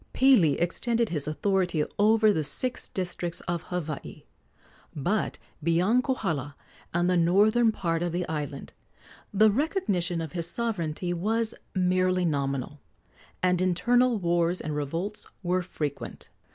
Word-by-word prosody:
Pili 230 - +5
extended 230 +6 0
his 150 -4 -2
authority 180 -1 0
over 215 0 +5
the 160 - 0
six 250 - 0
districts 175 -2 -3
of 175 -2 -3
Hawaii; 160 -5 -5 0.7
but 175 +9 -1 0.2
beyond 180 +10 +2
Kohala 160 - -2 0.4
and 175 +1 +1
the 180 - +2
northern 210 +7 +4
part 165 -5 -1
of 175 -1 -1
the 175 +1 -2
island 150 -3 -5 0.6
the 215 +1 +5
recognition 205 - 0
of 160 -3 -4
his 170 -2 -2
sovereignty 180 -7 -2
was 220 +6 0 0.2
merely 185 0 +2
nominal, 140 -2 -2 0.6
and 180 -1 +3
internal 240 +7 +3
wars 175 -1 +1
and 155 -1 -4
revolts 165 +8 -3 0.2
were 180 +1 +1
frequent. 150 -5 -5
180 Hz, 125 wpm, -27 LUFS, 165-210 Hz, 0.7 s, Pili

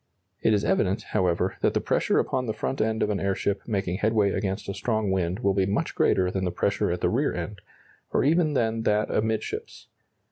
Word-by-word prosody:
It - - +3
is 100 - 0
evident, 100 +4 +1
however, 90 0 +1
that - - +2
the - - +3
pressure - - +1
upon 125 -1 0
the 110 - -2
front 135 - -2
end 110 0 +1
of 105 - 0
an 100 - -1
airship 100 0 -1
making 95 -5 -1
headway 105 -1 +2
against 95 +1 -2
a 100 - -3
strong 110 0 -1
wind 95 +2 -1
will 100 -4 +2
be 95 -1 +1
much 100 - -1
greater 90 -1 +2
than 95 0 -2
the 90 - +1
pressure 100 +4 0
at 90 - -2
the - - +2
rear - - +1
end, 105 -2 -5 0.5
or - - +2
even 155 +2 +3
than 115 -3 0
that 105 -1 +1
amidships. 110 0 -3
100 Hz, 210 wpm, -26 LUFS, 95-110 Hz, 0.5 s, It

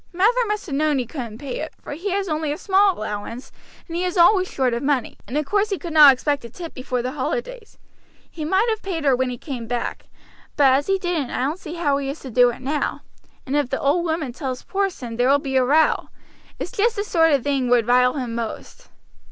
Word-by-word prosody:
Mather 450 +7 +2
must 420 0 -2
have 300 - -6
known 300 0 +1
he 255 - -1
couldn't 235 -4 -7
pay 265 0 -5
it, 315 - -6
for - - -8
he 345 +8 -4
has 390 +1 -1
only 310 -2 -1
a 295 - -3
small 390 0 +3
allowance, 215 +4 -6 0.4
and 335 - -6
he 350 - -1
is 365 +1 -2
always 370 +2 +5
short 255 -3 0
of 235 - -2
money, 275 -4 0
and 250 +7 -3
of 300 - 0
course 410 +5 +1
he 395 - -1
could 340 -3 -7
not 300 -3 +9
expect 280 +1 -1
a 235 - -8
tip 335 +7 -8
before 255 -2 -3
the 255 - -2
holidays. 480 - -4 0.5
He 315 - -6
might 380 +8 +2
have 440 -1 -1
paid 335 -6 -4
her 270 -2 +4
when 260 0 0
he 245 - -5
came 245 -4 -6
back, 240 0 -4 0.5
but 275 -3 +5
as 280 +2 +1
he 390 0 +2
didn't 350 -8 -2
I - - -2
don't 300 +7 -2
see 330 -1 -7
how 295 -5 +1
he 275 -1 -3
is 280 - -5
to 260 - -8
do 245 +1 +5
so - - -9
now, 285 +3 -2 0.4
and 275 - -2
if 290 -4 +1
the 270 - -2
old 295 +5 +2
woman 320 -6 -2
tells 260 -1 -5
Porson 365 - -3
there 245 +2 +3
will 280 - +6
be 275 -1 -4
a 260 - +4
row. 300 +5 +2 0.5
It's - - -5
just 465 0 +1
the 405 - -1
sort 325 -6 +3
of 275 -4 +2
thing 275 -3 0
would 240 -2 +4
rile 250 +1 +4
him 250 -5 -3
most." 235 - -6
290 Hz, 245 wpm, -22 LUFS, 255-360 Hz, 0.5 s, not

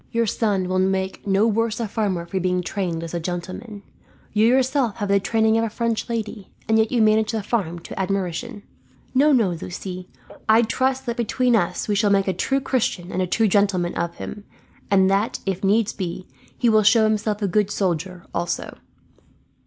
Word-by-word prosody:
Your 230 -1 +1
son 200 -3 0
will 185 0 0
make 190 +1 -1
no 195 +2 +3
worse 230 0 0
a 230 - -1
farmer 195 -5 -1
for 190 +2 -3
being 180 0 0
trained 175 -3 -3
as 165 - -7
a 170 - -1
gentleman. 185 +5 -6 0.5
You 215 +1 +4
yourself 260 -2 +2
have 205 -3 -3
the 200 0 +4
training 220 +2 +2
of - - +1
a 225 - -1
French 230 +1 -2
lady, 215 -3 -4 0.2
and 220 0 +3
yet 220 0 +2
you 235 -3 +3
manage 215 +1 +3
the 220 -2 -2
farm 195 -6 -1
to 170 - -9
admiration. 195 +3 -3 0.5
"No, 285 +3 +4
no, 235 -8 +4
Lucie, 180 +2 -6 0.4
I 225 +2 +6
trust 260 +3 0
that 235 -1 -3
between 240 +1 +1
us 175 -6 0
we 210 - +1
shall 205 0 +2
make 200 -1 +2
a 190 - +1
true 270 +7 0
Christian 245 -9 -1
and 185 - -1
a 185 - 0
true 225 +5 +2
gentleman 190 -3 +2
of 170 0 -3
him; 205 - -7 0.5
and 190 -1 +4
that, 200 +3 +1
if 195 -1 -2
needs 205 +2 +2
be, 180 -2 -5 0.3
he 245 - +1
will 215 -1 +5
show 220 +2 +5
himself 215 -1 0
a - - +2
good 205 +2 +1
soldier, 180 -2 -2
also." 170 0 -3
205 Hz, 195 wpm, -22 LUFS, 185-225 Hz, 0.5 s, I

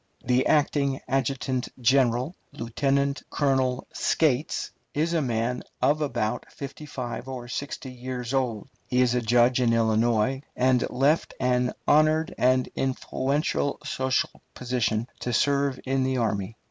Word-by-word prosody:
The 125 +1 +2
acting 140 -2 +2
adjutant 130 -1 -1
general, 130 +4 +2 0.2
Lieutenant 140 +4 0
Colonel 130 -3 +1
Scates, 150 -2 +1 0.2
is 160 +3 +1
a 165 - +2
man 120 -1 -1 0.2
of 145 +4 +2
about 120 -5 -1
fifty 140 +2 -8
five 125 -2 -5
or 125 -2 -6
sixty 135 +1 -5
years 125 0 -5
old; 125 -5 -1 0.2
he 125 0 +2
was 125 -1 +3
a 125 - +1
judge 120 +2 +3
in 115 -2 +3
Illinois, 115 +3 +2
and 125 -1 +2
left 145 +5 +1
an 125 -1 +1
honored 155 +1 +4
and 130 0 +3
influential 135 +2 -1
social 130 -2 -1
position 120 -3 -1
to 125 - -3
serve 140 +1 +2
in 135 0 +1
the 130 0 0
army. 105 -2 -1
130 Hz, 135 wpm, -26 LUFS, 120-140 Hz, 0.2 s, honored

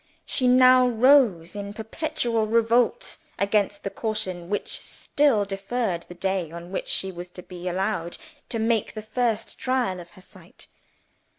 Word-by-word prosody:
She 255 - +1
now 255 0 +6
rose 230 - +4
in 200 0 -5
perpetual 225 -1 -2
revolt 230 - +2 0.2
against 200 0 0
the 200 - -3
caution 190 -6 -3
which 205 - -3
still 275 -8 +1
deferred 195 -2 -3
the 175 - -10
day 190 -3 -2
on 170 +1 -9
which 195 - -3
she 190 - -1
was 175 0 -8
to 180 0 -11
be 180 0 -8
allowed 180 -2 -2 0.3
to 235 - -1
make 225 -1 0
the 215 - -6
first 225 0 -2
trial 255 -8 0
of 175 0 -11
her - - -13
sight. - - -15
210 Hz, 155 wpm, -25 LUFS, 185-240 Hz, 0.3 s, now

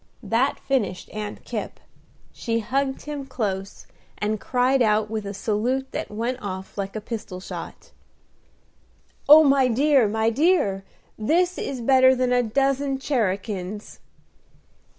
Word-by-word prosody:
That 245 +5 +1
finished 215 -9 -2
Aunt 210 -1 -6
Kipp; - - -5 0.5
she 230 -1 -2
hugged 265 +4 -1
him 295 -2 -5
dose, 195 -6 -4 0.3
and 215 0 -2
cried 255 +1 +2
out 215 -1 +2
with 215 -2 -3
a 200 - -4
salute 240 +6 -1
that - - -4
went 235 +4 -3
off 190 -1 -6
like 195 0 -4
a - - -2
pistol 210 -4 -6
shot, 185 - -9 1.4
"Oh, 310 +2 +10
my 275 -2 +4
dear, 265 0 +3
my 220 +2 +1
dear! 250 - +2 0.4
this 350 - +1
is 265 -3 -4
better 260 +1 +5
than 250 -1 +1
a 245 - +4
dozen 275 +3 0
cherakins!" 205 -6 -3
235 Hz, 130 wpm, -24 LUFS, 210-270 Hz, 1.4 s, Oh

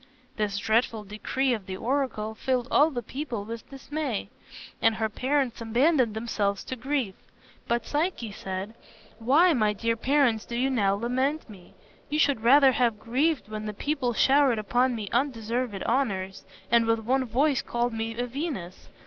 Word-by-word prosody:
This 210 -2 -1
dreadful 220 +1 +1
decree 245 +6 -1
of 215 -5 -5
the 185 -1 -5
oracle 240 -3 -1
filled 250 +2 -1
all 300 +2 +5
the 245 -6 -4
people 245 -4 -5
with 230 +1 -8
dismay, 275 -3 -4 0.5
and 225 -1 +4
her 220 0 -1
parents 260 +1 -1
abandoned 240 +1 +2
themselves 210 -3 -1
to 260 - -5
grief. 255 -4 -2 0.5
But 235 0 0
Psyche 295 - -1
said, 195 +2 -5 0.5
"Why, 300 +10 +4
my 215 -5 +2
dear 230 +2 -1
parents, 245 -2 +2
do 235 - -6
you 260 +3 +1
now 200 -6 +2
lament 260 +7 -1
me? 195 -6 -15 0.3
You 300 - -1
should 280 -6 +2
rather 270 +3 +6
have 235 -4 +1
grieved 270 +6 0
when 215 0 -5
the 210 - -4
people 275 -1 -1
showered 270 0 +4
upon 245 +4 +1
me 215 -3 -5
undeserved 235 -4 -1
honors, 200 -7 -1 0.3
and 235 -1 +4
with 225 0 +3
one 260 +4 +1
voice 270 +4 +1
called 240 0 -1
me 225 0 -4
a 245 - -1
Venus. 245 - -5
235 Hz, 165 wpm, -27 LUFS, 215-270 Hz, 0.5 s, rather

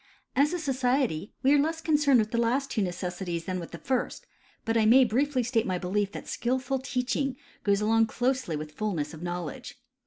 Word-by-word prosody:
As 290 +3 +4
a 355 - -1
society, 255 - 0
we 270 +2 +5
are 290 - +5
less 320 +3 0
concerned 295 -4 +3
with 215 0 0
the 235 - 0
last 265 +4 0
two 215 - 0
necessities 180 -2 -3
than 185 -1 -2
with 170 - -7
the 170 - -8
first, 255 +7 -2 0.4
but 225 - 0
I 225 - +4
may 260 +4 +7
briefly 255 +3 +1
state 230 -2 0
my 185 -1 0
belief 195 +3 -1
that - - -7
skilful 260 +2 -1
teacliing 260 +1 -1 0.3
goes 200 0 +2
along 225 +1 +3
closely 250 -6 -1
with 150 0 -5
fullness 165 -6 -2
of 160 - -10
knowledge. 175 +7 -5
230 Hz, 195 wpm, -28 LUFS, 185-265 Hz, 0.4 s, may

